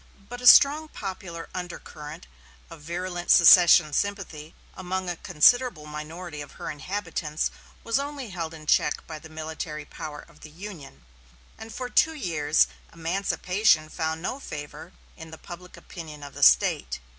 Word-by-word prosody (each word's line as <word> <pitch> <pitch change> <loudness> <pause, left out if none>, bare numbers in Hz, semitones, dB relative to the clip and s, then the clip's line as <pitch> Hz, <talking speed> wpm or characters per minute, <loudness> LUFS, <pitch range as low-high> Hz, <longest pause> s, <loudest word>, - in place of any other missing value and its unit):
But 245 +1 -7
a 250 - +1
strong 295 +5 +8
popular 185 - -7
undercurrent 165 -3 -8 0.5
of 165 -2 -11
virulent 175 +2 -5
secession 170 -3 +7
sympathy 175 -6 -3 0.2
among 185 0 -4
a 175 - -2
considerable 175 +2 +3
minority 150 +1 -7
of 145 - -10
her - - -6
inhabitants 160 -1 -3 0.3
was 230 +3 +1
only 280 -4 -5
held 165 -3 -5
in 155 -1 -12
check 150 - +1
by 155 -1 -8
the 160 - -13
military 155 -1 -6
power 150 0 -8
of 170 -3 -21
the 155 - -12
Union, 170 - -11 0.5
and 220 0 -10
for 250 +2 -5
two 320 +5 +2
years 160 - +2 0.3
emancipation 180 0 +1
found 160 +1 -3
no 255 +8 -3
favor 150 - -8 0.3
in 160 -1 -10
the 160 - -10
public 180 +2 -11
opinion 155 -4 -10
of 145 - -10
the - - -9
State. - - +4
170 Hz, 150 wpm, -26 LUFS, 155-195 Hz, 0.5 s, strong